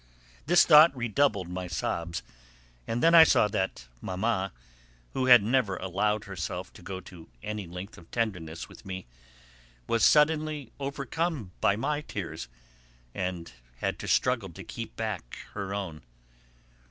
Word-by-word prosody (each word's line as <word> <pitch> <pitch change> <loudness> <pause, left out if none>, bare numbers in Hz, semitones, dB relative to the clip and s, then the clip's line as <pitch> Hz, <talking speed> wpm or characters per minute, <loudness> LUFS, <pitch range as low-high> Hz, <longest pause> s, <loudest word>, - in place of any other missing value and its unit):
This 175 +1 +6
thought 150 -2 +8
redoubled 120 -5 +1
my 90 +1 -5
sobs, 85 +2 -3 0.6
and 115 +2 -1
then 165 +1 +6
I 165 -1 +11
saw 125 - +4
that 95 -11 -2 0.2
Mamma, 95 0 -1 0.6
who 130 -1 0
had 125 -4 +9
never 110 -4 +1
allowed 105 +4 0
herself 90 -1 -5
to - - -14
go 95 +1 -6
to 90 -4 -13
any 105 -3 -4
length 90 +5 -8
of 85 - -18
tenderness 90 -9 -3
with - - -15
me, 95 -1 -6 0.8
was 115 - +1
suddenly 150 -3 +3
overcome 140 - -3
by 105 -2 +4
my 145 +6 -1
tears 85 - -6 0.7
and 90 -3 -4 0.3
had - - -2
to - - -6
struggle 120 -6 +2
to 85 - -10
keep 115 -1 -7
back 105 - -4 0.2
her 100 -2 -4
own. 95 -6 -4
105 Hz, 140 wpm, -28 LUFS, 90-130 Hz, 0.8 s, I